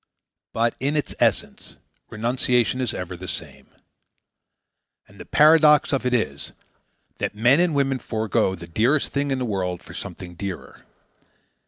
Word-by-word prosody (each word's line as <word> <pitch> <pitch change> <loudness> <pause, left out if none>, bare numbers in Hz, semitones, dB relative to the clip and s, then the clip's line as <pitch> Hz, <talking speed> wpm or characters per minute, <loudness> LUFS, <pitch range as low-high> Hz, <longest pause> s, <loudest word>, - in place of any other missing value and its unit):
But, 115 +1 +1
in 140 +3 -1
its 150 - -2
essence, - - 0 0.3
renunciation 120 +2 0
is 125 -4 -1
ever 90 -4 -5
the 95 +1 -9
same. - - -7 1.4
And - - -19
the - - -9
paradox 150 -1 +5
of 130 -2 0
it 125 - 0
is, 70 - -2 0.7
that - - -2
men 120 +7 +4
and 175 -3 +2
women 135 -2 +1
forego 110 -5 0
the 85 -2 -10
dearest 115 - +1
thing 140 0 0
in 135 - 0
the 130 - -2
world 90 -5 -3
for - - -12
something 90 -1 -7
dearer. 95 +1 -7
120 Hz, 150 wpm, -23 LUFS, 95-140 Hz, 1.4 s, paradox